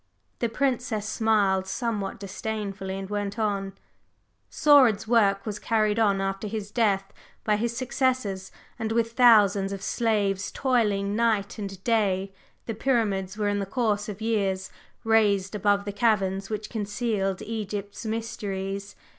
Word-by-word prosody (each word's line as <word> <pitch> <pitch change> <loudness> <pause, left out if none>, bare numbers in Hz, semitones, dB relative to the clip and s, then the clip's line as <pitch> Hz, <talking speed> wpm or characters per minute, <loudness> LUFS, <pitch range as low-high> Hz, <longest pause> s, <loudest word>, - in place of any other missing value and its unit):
The 235 - 0
Princess 245 -4 -1
smiled 205 -4 +2
somewhat 205 -3 -3
disdainfully, 200 -1 -4
and 195 0 -5
went 205 +1 -3
on: 200 -3 -1 0.8
"Saurid's 260 -9 +5
work 205 -4 +3
was 210 -2 -4
carried 215 -1 +1
on 200 -3 +3
after 195 +2 -2
his 210 -1 -5
death 200 -4 +1 0.3
by 215 - +2
his 235 +2 -2
successors, 255 -7 -1 0.3
and 220 -1 -2
with 230 0 +1
thousands 210 -5 +5
of 195 -1 -5
slaves 200 -4 0
toiling 210 -6 +1
night 220 -2 0
and 195 -2 -6
day 195 -4 +1 0.3
the 225 - -3
Pyramids 210 -5 0
were 210 -1 0
in 205 0 0
the 195 - -3
course 210 -2 0
of 205 +1 -7
years 195 -4 -1 0.3
raised 210 -3 +3
above 205 0 +1
the 205 - -3
caverns 195 -3 +1
which 215 -1 -4
concealed 205 -3 -2
Egypt's 205 -2 -5
mysteries. 200 -3 -4
210 Hz, 140 wpm, -26 LUFS, 195-225 Hz, 0.8 s, Saurid's